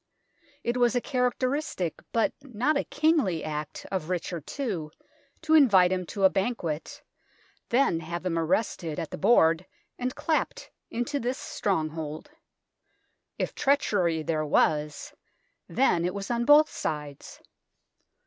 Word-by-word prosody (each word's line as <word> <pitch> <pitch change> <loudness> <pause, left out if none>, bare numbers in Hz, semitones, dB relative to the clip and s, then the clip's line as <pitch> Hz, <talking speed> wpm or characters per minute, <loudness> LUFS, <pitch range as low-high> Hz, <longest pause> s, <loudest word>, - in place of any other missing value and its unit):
It 240 +1 -1
was 245 0 +3
a - - +4
characteristic, 250 - -1
but 230 - +1
not 270 +2 0
a 280 - 0
kingly, 290 - +1
act 150 -1 -5
of 185 -4 -3
Richard 175 -3 -4
II 195 - -2 0.6
to 315 0 +1
invite 200 - +6
him 185 -2 -1
to 200 - -4
a 190 - +8
banquet, 190 -7 -3 0.7
then 235 -9 +3
have 170 +2 -6
him 165 -2 0
arrested 165 -2 -1
at 160 - -4
the - - -6
board 165 -4 +4 0.3
and 250 +1 -2
clapt - - -2 0.2
into 240 +5 -2
this 250 +1 -2
stronghold. 160 - -3 1.1
If - - -2
treachery 200 - +1
there 155 0 -1
was, 150 0 +1 0.6
then 210 -10 +2
it 180 +2 -1
was 200 +3 -4
on 235 0 0
both 300 +2 +6
sides. 150 -2 -5
190 Hz, 130 wpm, -27 LUFS, 160-250 Hz, 1.1 s, a